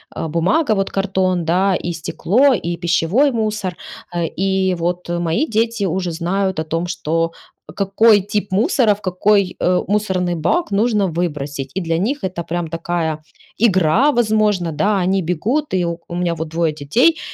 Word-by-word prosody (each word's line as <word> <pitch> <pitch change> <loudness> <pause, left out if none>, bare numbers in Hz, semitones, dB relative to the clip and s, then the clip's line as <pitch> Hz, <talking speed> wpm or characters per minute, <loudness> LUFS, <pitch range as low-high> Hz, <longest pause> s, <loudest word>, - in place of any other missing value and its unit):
э, - - -3
бумага, 190 - +1
вот 195 -1 -1
картон, 190 -3 0
да, 185 +3 +2
и 175 - -1
стекло, 205 - +2
и 175 -6 -2
пищевой 180 - +2
мусор, 215 -5 -2 0.4
Э, 170 -1 0
и 190 +2 0
вот 175 +1 -3
мои 175 - 0
дети 225 -2 0
уже 180 0 -1
знают 185 +2 -1
о - - 0
том, 165 +2 -2
что 165 -1 -1 0.4
какой 205 +2 +4
тип 205 +1 -3
мусора 225 - +3
в 205 - -18
какой, 195 +1 +1
э, 180 0 +2
мусорный 190 -3 0
бак 205 - 0
нужно 210 -1 +2
выбросить. 150 -5 -3
И - - 0
для 165 -1 -1
них 265 +10 -2
это 180 -2 -3
прям 175 0 -2
такая 165 -1 -2 0.5
игра, 190 - +3
возможно, 215 - +1
да, 200 +7 +1
они 190 +2 +1
бегут, 210 - -1
и 180 -2 +1
У 170 0 -5
меня 175 -1 0
вот 160 0 -4
2 165 0 0
детей, 230 - +2
185 Hz, 165 wpm, -19 LUFS, 170-210 Hz, 0.5 s, какой